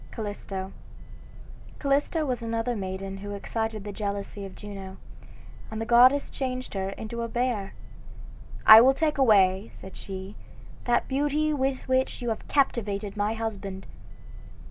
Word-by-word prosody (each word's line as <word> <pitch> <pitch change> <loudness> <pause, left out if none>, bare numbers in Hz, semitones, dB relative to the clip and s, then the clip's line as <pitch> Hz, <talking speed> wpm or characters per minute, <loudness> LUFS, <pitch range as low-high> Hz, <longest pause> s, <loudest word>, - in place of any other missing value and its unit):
CALLISTO 200 -3 -5 1.1
Callisto 290 +3 +1
was 250 -3 -2
another 230 +1 -2
maiden 195 -1 -5
who 205 +1 -6
excited 220 +1 -3
the 205 - -5
jealousy 200 0 -4
of 190 - -13
Juno, 195 -2 -8 0.7
and 220 - -5
the 225 - -2
goddess 250 +4 +5
changed 255 -1 -4
her 190 -1 -2
into 220 +4 -6
a 230 - -2
bear. 235 -4 -2 0.9
"I 220 +1 +11
will 265 +2 +5
take 305 -2 0
away," 200 -5 +4
said 190 - -12
she, 190 +1 -7 0.5
"that 240 -1 +2
beauty 295 +3 +1
with 265 -2 -1
which 260 0 +1
you 240 -2 -3
have 220 - -4
captivated 210 -7 0
my 210 +2 0
husband." 200 -4 -5
220 Hz, 140 wpm, -27 LUFS, 200-255 Hz, 1.1 s, I